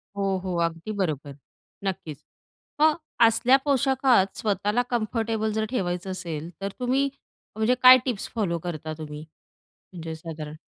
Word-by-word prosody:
हो, 195 Hz, -1 st, 0 dB
हो. 185 Hz, -2 st, -3 dB
अगदी 165 Hz, +5 st, -5 dB
बरोबर. 145 Hz, -5 st, -2 dB, 0.5 s
नक्कीच, 170 Hz, -6 st, -4 dB, 0.6 s
"मग, 310 Hz, -1 st, +6 dB, 0.3 s
असल्या 245 Hz, +4 st, +4 dB
पोशाखात 265 Hz, -7 st, +3 dB
स्वतःला 210 Hz, +2 st, 0 dB
कम्फर्टेबल 225 Hz, -2 st, -1 dB
जर 220 Hz, 0 st, -1 dB
ठेवायचं 185 Hz, -5 st, -2 dB
असेल, 170 Hz, -3 st, -5 dB
तर 195 Hz, -, -2 dB
तुम्ही 265 Hz, +3 st, +1 dB, 0.5 s
म्हणजे 220 Hz, +3 st, +2 dB
काय 255 Hz, 0 st, +11 dB
टिप्स 240 Hz, -6 st, -1 dB
फॉलो 170 Hz, -6 st, 0 dB
करता 155 Hz, -2 st, -4 dB
तुम्ही 150 Hz, -1 st, -7 dB, 0.7 s
म्हणजे 165 Hz, -2 st, -6 dB
साधारण?" 155 Hz, -2 st, -7 dB
195 Hz, 130 wpm, -25 LUFS, 165-240 Hz, 0.7 s, काय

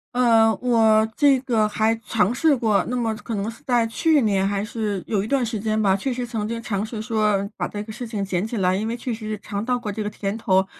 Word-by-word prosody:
呃， 225 Hz, -3 st, +4 dB
我 220 Hz, -3 st, +4 dB
这 280 Hz, -2 st, +5 dB
个 230 Hz, -5 st, +1 dB
还 220 Hz, +1 st, +1 dB
尝 220 Hz, 0 st, +2 dB
试 305 Hz, +1 st, +3 dB
过， 215 Hz, -6 st, +1 dB
那 250 Hz, -, -2 dB
么 230 Hz, -2 st, 0 dB
可 230 Hz, 0 st, -5 dB
能 205 Hz, +3 st, -2 dB
是 235 Hz, -, -16 dB
在 240 Hz, -2 st, +3 dB
去 295 Hz, +6 st, +2 dB
年 195 Hz, -3 st, +2 dB
还 200 Hz, 0 st, -1 dB
是 210 Hz, -3 st, -3 dB
有 205 Hz, -3 st, 0 dB
一 210 Hz, -, -4 dB
段 270 Hz, -2 st, +1 dB
时 220 Hz, -2 st, -3 dB
间 215 Hz, +1 st, -1 dB
吧， 195 Hz, -2 st, +3 dB
确 250 Hz, +7 st, -1 dB
实 245 Hz, 0 st, -3 dB
曾 225 Hz, -3 st, -3 dB
经 230 Hz, +1 st, -4 dB
尝 205 Hz, -2 st, -2 dB
试 220 Hz, -1 st, -6 dB
说 215 Hz, -3 st, +1 dB
把 -, -, -1 dB
这 205 Hz, 0 st, -5 dB
个 220 Hz, -, -9 dB
事 240 Hz, +2 st, -6 dB
情 210 Hz, -3 st, -3 dB
捡 190 Hz, +1 st, -1 dB
起 235 Hz, -, -5 dB
来， 185 Hz, -2 st, +2 dB
因 210 Hz, +4 st, -1 dB
为 235 Hz, -, -2 dB
确 245 Hz, 0 st, -4 dB
实 215 Hz, -1 st, -5 dB
尝 205 Hz, +1 st, -4 dB
到 250 Hz, 0 st, +1 dB
过 225 Hz, -4 st, -4 dB
这 215 Hz, +2 st, -4 dB
个 210 Hz, -, -2 dB
甜 200 Hz, +1 st, -4 dB
头， 190 Hz, -3 st, +2 dB
220 Hz, 280 characters per minute, -23 LUFS, 205-235 Hz, -, 这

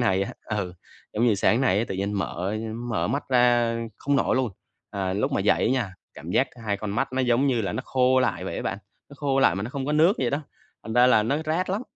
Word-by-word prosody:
nay 95 Hz, -5 st, +2 dB
á, 100 Hz, -, -4 dB, 0.2 s
ừ, 90 Hz, -3 st, -3 dB, 0.4 s
giống 115 Hz, +3 st, +1 dB
như 110 Hz, -, +4 dB
sáng 115 Hz, +5 st, +2 dB
nay 100 Hz, -7 st, +3 dB
á, 115 Hz, -, +1 dB
tự -, -, -3 dB
nhiên 100 Hz, +2 st, -2 dB
mở 100 Hz, 0 st, -2 dB, 0.3 s
mở 115 Hz, -, 0 dB
mắt 140 Hz, +6 st, -1 dB
ra 120 Hz, -2 st, +3 dB, 0.2 s
không 140 Hz, 0 st, 0 dB
nổi 135 Hz, -, +2 dB
luôn. 130 Hz, -3 st, 0 dB, 0.4 s
À, 95 Hz, -2 st, -2 dB
lúc 100 Hz, -, -1 dB
mà -, -, +1 dB
dậy 105 Hz, -, +2 dB
á -, -, +2 dB
nha, 115 Hz, -8 st, -1 dB, 0.2 s
cảm 80 Hz, +3 st, -8 dB
giác 130 Hz, +7 st, +2 dB, 0.2 s
hai 100 Hz, -2 st, 0 dB
con 105 Hz, 0 st, -5 dB
mắt 115 Hz, +4 st, -1 dB
nó, 130 Hz, -, 0 dB
giống 125 Hz, +2 st, +2 dB
như 125 Hz, -4 st, +2 dB
là, 95 Hz, -, -2 dB
nó -, -, -3 dB
khô 130 Hz, 0 st, +3 dB
lại 125 Hz, -, 0 dB
vậy -, -, -4 dB
á -, -, -3 dB
bạn, -, -, -3 dB, 0.3 s
nó -, -, -13 dB
khô 140 Hz, -2 st, 0 dB
lại 90 Hz, -, +4 dB
mà 100 Hz, -, -3 dB
nó 115 Hz, -, -5 dB
không 135 Hz, -1 st, -4 dB
có 150 Hz, -, 0 dB
nước 165 Hz, +7 st, +4 dB
vậy 125 Hz, -3 st, 0 dB
đó, 145 Hz, +2 st, -1 dB, 0.4 s
thành 110 Hz, -, -6 dB
ra 125 Hz, +1 st, +5 dB
là 110 Hz, -4 st, +5 dB
nó 120 Hz, +7 st, 0 dB
rát 165 Hz, +4 st, -1 dB
lắm. 205 Hz, +5 st, -1 dB
120 Hz, 270 wpm, -25 LUFS, 100-135 Hz, 0.4 s, ra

